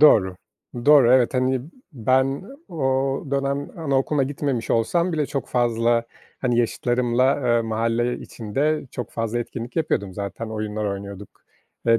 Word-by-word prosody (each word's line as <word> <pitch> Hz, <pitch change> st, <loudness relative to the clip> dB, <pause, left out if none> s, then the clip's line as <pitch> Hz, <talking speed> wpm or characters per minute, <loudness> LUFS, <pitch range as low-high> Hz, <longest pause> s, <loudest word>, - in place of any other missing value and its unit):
Doğru, 95 Hz, -11 st, +6 dB, 0.5 s
doğru, 140 Hz, -5 st, +7 dB
evet, 130 Hz, 0 st, +4 dB
hani, 130 Hz, 0 st, +2 dB, 0.3 s
ben 130 Hz, -, +1 dB, 0.3 s
o 135 Hz, -4 st, 0 dB
dönem 140 Hz, +1 st, -1 dB
anaokuluna 140 Hz, -1 st, +1 dB
gitmemiş 135 Hz, -3 st, -2 dB
olsam 170 Hz, +10 st, +2 dB
bile 155 Hz, -3 st, 0 dB
çok 135 Hz, -1 st, -4 dB
fazla, 120 Hz, -1 st, +2 dB, 0.4 s
hani, 120 Hz, -2 st, +1 dB
yaşıtlarımla, 120 Hz, +3 st, +2 dB
eee, 120 Hz, -1 st, +3 dB
mahalle 115 Hz, +2 st, 0 dB
içinde 140 Hz, +8 st, -2 dB
çok 125 Hz, -, -5 dB
fazla 115 Hz, +1 st, -2 dB
etkinlik 120 Hz, 0 st, -6 dB
yapıyordum. 100 Hz, -, 0 dB
Zaten 100 Hz, +3 st, -5 dB
oyunlar 110 Hz, -1 st, -3 dB
oynuyorduk 100 Hz, 0 st, -5 dB, 0.6 s
ve 115 Hz, 0 st, +5 dB
120 Hz, 130 wpm, -23 LUFS, 115-135 Hz, 0.6 s, doğru